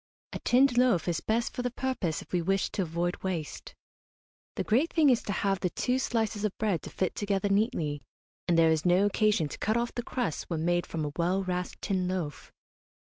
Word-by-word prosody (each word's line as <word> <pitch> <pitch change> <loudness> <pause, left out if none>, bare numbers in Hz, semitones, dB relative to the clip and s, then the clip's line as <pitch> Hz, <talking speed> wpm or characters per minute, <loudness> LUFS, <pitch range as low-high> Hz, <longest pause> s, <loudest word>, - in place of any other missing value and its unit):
A - - -4
tinned 250 0 +4
loaf 245 -10 +3
is 165 -2 0
best 230 +2 0
for - - -3
the 245 - -1
purpose 245 - -2
if - - -24
we 180 - +2
wish 195 +3 0
to - - -1
avoid 175 +1 -1
waste. 175 -5 -4 0.8
The - - -1
great 260 +10 +2
thing 305 -5 +5
is 240 - +2
to - - -4
have 195 -1 0
the 180 - 0
two 250 +8 0
slices 220 -4 -1
of 210 -3 -1
bread 205 -6 0
to - - -8
fit 185 - -1
together 200 -1 -1
neatly, 195 - 0 0.5
and 170 - +3
there 165 -1 +5
is 160 -1 +1
no 180 +2 +4
occasion 205 -5 +2
to - - -8
cut 220 +2 +1
off 235 0 -1
the 240 - -2
crusts 240 - -3
when 165 -2 -2
made 175 0 +1
from 160 -2 -3
a 145 - -3
well 185 +3 +1
rasped 180 -1 -4
tin 185 -3 0
loaf. 180 -6 -4
195 Hz, 215 wpm, -29 LUFS, 175-230 Hz, 0.8 s, thing